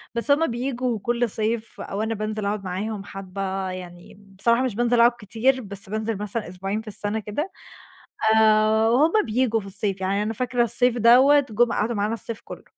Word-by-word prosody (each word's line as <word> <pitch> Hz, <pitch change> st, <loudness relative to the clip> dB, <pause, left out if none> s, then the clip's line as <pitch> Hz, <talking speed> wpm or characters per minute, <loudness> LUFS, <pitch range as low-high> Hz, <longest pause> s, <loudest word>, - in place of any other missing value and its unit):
بس 235 Hz, +5 st, 0 dB
هُم 315 Hz, +3 st, +4 dB
بييجوا 245 Hz, -1 st, -2 dB
كُل 240 Hz, +2 st, 0 dB
صيف، 220 Hz, +2 st, -3 dB
أو 200 Hz, -, -4 dB
أنا 220 Hz, +1 st, -1 dB
بانزل 215 Hz, 0 st, -3 dB
أقعد 200 Hz, 0 st, -2 dB
معاهم 195 Hz, +3 st, -4 dB
حبّة، 195 Hz, -1 st, -4 dB
يعني 175 Hz, 0 st, -10 dB, 0.2 s
بصراحة 235 Hz, +4 st, +3 dB
مش 250 Hz, -6 st, -2 dB
بانزل 240 Hz, +1 st, +2 dB
أقعد 235 Hz, +1 st, +7 dB
كتير، 240 Hz, +5 st, +1 dB
بس 200 Hz, -3 st, -9 dB
بانزل 220 Hz, +1 st, -2 dB
مثلًا 210 Hz, -1 st, -4 dB
أسبوعين 195 Hz, +4 st, -4 dB
في 220 Hz, -, -19 dB
السنة 210 Hz, +1 st, -3 dB
كده 255 Hz, -, -4 dB, 0.9 s
آآ، 220 Hz, 0 st, +4 dB
وهُم 290 Hz, +8 st, +3 dB
بييجوا 230 Hz, 0 st, +1 dB
في 195 Hz, -, -11 dB
الصيف، 195 Hz, 0 st, -3 dB
يعني 195 Hz, +2 st, 0 dB
أنا 215 Hz, +1 st, -2 dB
فاكرة 245 Hz, +1 st, 0 dB
الصيف 240 Hz, +1 st, +1 dB
دوّة 255 Hz, +6 st, +6 dB
جُم 235 Hz, +2 st, +2 dB
قعدوا 230 Hz, +3 st, 0 dB
معانا 210 Hz, +1 st, 0 dB
الصيف 230 Hz, -1 st, -6 dB
كُلّه. -, -, -10 dB
220 Hz, 185 wpm, -24 LUFS, 200-240 Hz, 0.9 s, أقعد